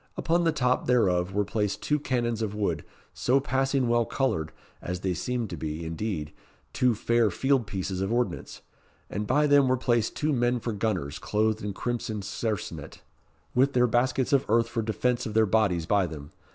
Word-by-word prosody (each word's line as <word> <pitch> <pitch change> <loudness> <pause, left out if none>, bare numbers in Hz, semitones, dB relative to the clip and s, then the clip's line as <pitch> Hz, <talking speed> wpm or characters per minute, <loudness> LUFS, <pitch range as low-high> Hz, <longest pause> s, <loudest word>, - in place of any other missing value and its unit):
Upon 170 +1 +1
the 165 - +4
top 125 -4 0
thereof 95 -7 +2
were 100 +1 0
placed 105 -1 -2
two 150 0 +1
cannons 120 -5 -1
of 105 -2 -2
wood, 105 -1 -1 0.3
so 130 +3 +2
passing 135 -1 0
well 120 0 +3
coloured, 95 - -1 0.3
as 90 0 -4
they 95 -1 0
seemed 120 +5 -3
to 85 - -5
be, 80 +2 -4
indeed, 80 -2 -4 0.4
two 125 -2 +2
fair 115 +1 +2
field 135 +3 +1
pieces 95 -2 -3
of 95 +2 -1
ordnance; 120 +1 -2 0.5
and 105 +1 -3
by 145 +5 +3
them 145 -2 +5
were 130 0 +2
placed 120 -3 +1
two 150 0 0
men 120 -1 +1
for 115 0 -3
gunners, 95 -9 -2
clothed 110 +1 0
in 105 -1 -3
crimson 110 -2 -3
sarcenet, 110 +1 -4 0.5
with 135 +3 +3
their 125 0 +4
baskets 125 +3 +1
of 140 -1 +4
earth 115 +1 +3
for 115 - -1
defence 120 +3 -1
of 110 - -6
their 110 0 +5
bodies 95 -5 +2
by 100 0 +2
them. 75 -2 -9
115 Hz, 185 wpm, -27 LUFS, 100-125 Hz, 0.5 s, them